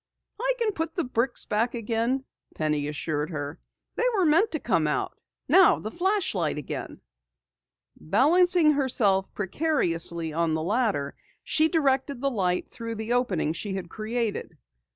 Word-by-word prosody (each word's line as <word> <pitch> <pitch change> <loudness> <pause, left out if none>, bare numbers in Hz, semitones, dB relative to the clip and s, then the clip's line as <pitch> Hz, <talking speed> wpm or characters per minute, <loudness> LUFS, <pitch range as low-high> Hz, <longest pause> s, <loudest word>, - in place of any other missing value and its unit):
"I - - +1
can 460 -3 0
put 325 -3 -4
the 345 - 0
bricks 245 0 -1
back 230 +4 0
again," 235 +4 -1 0.3
Penny 150 -2 -1
assured 150 0 -3
her. 145 -1 -5 0.4
"They - - +1
were 380 -3 +2
meant 330 +8 +4
to 315 - -1
come 175 - +1
out. 150 - -2 0.3
Now, 380 -1 +6
the 215 - -6
flashlight 350 - 0
again." 150 - -6 0.9
Balancing 315 - +4
herself 225 -9 +2
precariously 175 - 0
on 165 0 +1
the 160 - -2
ladder, 200 - 0 0.3
she 315 0 +2
directed 280 -5 +1
the 275 +1 0
light 180 -6 0
through 230 -1 -6
the 220 +2 -3
opening 190 -11 0
she 195 +3 -4
had 180 -3 -5
created. 220 -5 -3
230 Hz, 145 wpm, -26 LUFS, -, 0.9 s, Now